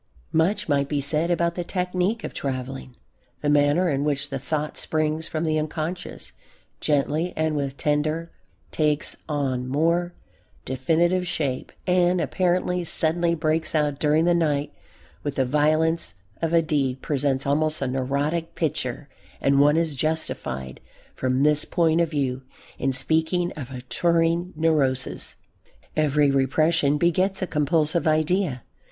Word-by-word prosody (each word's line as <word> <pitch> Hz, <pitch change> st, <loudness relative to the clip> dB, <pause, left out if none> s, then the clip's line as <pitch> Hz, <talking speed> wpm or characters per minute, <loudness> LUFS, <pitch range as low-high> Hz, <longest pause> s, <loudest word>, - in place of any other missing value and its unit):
Much 165 Hz, +6 st, +1 dB
might 140 Hz, -2 st, +1 dB
be 145 Hz, -, 0 dB
said 150 Hz, +4 st, +1 dB
about 170 Hz, -1 st, +1 dB
the 175 Hz, -, -3 dB
technique 180 Hz, +5 st, -1 dB
of -, -, -5 dB
travelling. 130 Hz, -1 st, -5 dB, 0.5 s
The 145 Hz, -, +1 dB
manner 145 Hz, +5 st, +3 dB
in 140 Hz, -3 st, 0 dB
which 145 Hz, -1 st, -1 dB
the 135 Hz, -, -2 dB
thought 150 Hz, +2 st, -3 dB
springs 155 Hz, +1 st, -1 dB
from 155 Hz, 0 st, -3 dB
the 155 Hz, -1 st, +1 dB
unconscious, 160 Hz, +3 st, -4 dB, 0.5 s
gently 150 Hz, +4 st, 0 dB
and 155 Hz, -1 st, 0 dB
with 140 Hz, -1 st, -2 dB
tender 150 Hz, +1 st, +1 dB
longing, 165 Hz, 0 st, -9 dB, 0.4 s
takes 150 Hz, -1 st, +1 dB
on 130 Hz, -4 st, -1 dB
more 170 Hz, +6 st, +1 dB, 0.5 s
definite 170 Hz, +7 st, +1 dB
shape 145 Hz, -7 st, -2 dB
and 180 Hz, 0 st, +3 dB
apparently 180 Hz, 0 st, 0 dB
suddenly 170 Hz, +1 st, +2 dB
breaks 160 Hz, 0 st, 0 dB
out 150 Hz, -2 st, +1 dB
during 155 Hz, +2 st, +3 dB
the 175 Hz, -, +4 dB
night 150 Hz, -4 st, 0 dB, 0.5 s
with 145 Hz, -1 st, -4 dB
the 130 Hz, -, +2 dB
violence 155 Hz, -, +1 dB, 0.3 s
of 165 Hz, -1 st, 0 dB
a 170 Hz, -1 st, +4 dB
deed, 135 Hz, -5 st, -1 dB
presents 135 Hz, -2 st, 0 dB
almost 155 Hz, +2 st, +1 dB
a -, -, -1 dB
neurotic 140 Hz, +6 st, -1 dB
picture, 140 Hz, -3 st, -2 dB, 0.3 s
and 140 Hz, 0 st, +3 dB
one 145 Hz, +2 st, +5 dB
is 165 Hz, -3 st, 0 dB
justified, 130 Hz, -, -3 dB, 0.3 s
from 130 Hz, +1 st, 0 dB
this 150 Hz, 0 st, +3 dB
point 165 Hz, -1 st, +2 dB
of 170 Hz, -, +1 dB
view, 135 Hz, -4 st, -1 dB, 0.4 s
in 135 Hz, -, +1 dB
speaking 160 Hz, +6 st, +1 dB
of 135 Hz, -5 st, -7 dB
a 130 Hz, -2 st, -7 dB
"touring 170 Hz, +6 st, +1 dB
neurosis." 145 Hz, -5 st, +1 dB, 0.6 s
Every 150 Hz, -2 st, +3 dB
repression 145 Hz, +2 st, +2 dB
begets 185 Hz, +4 st, +1 dB
a -, -, +1 dB
compulsive 155 Hz, +1 st, +1 dB
idea. 155 Hz, -3 st, +1 dB
155 Hz, 145 wpm, -24 LUFS, 140-170 Hz, 0.6 s, one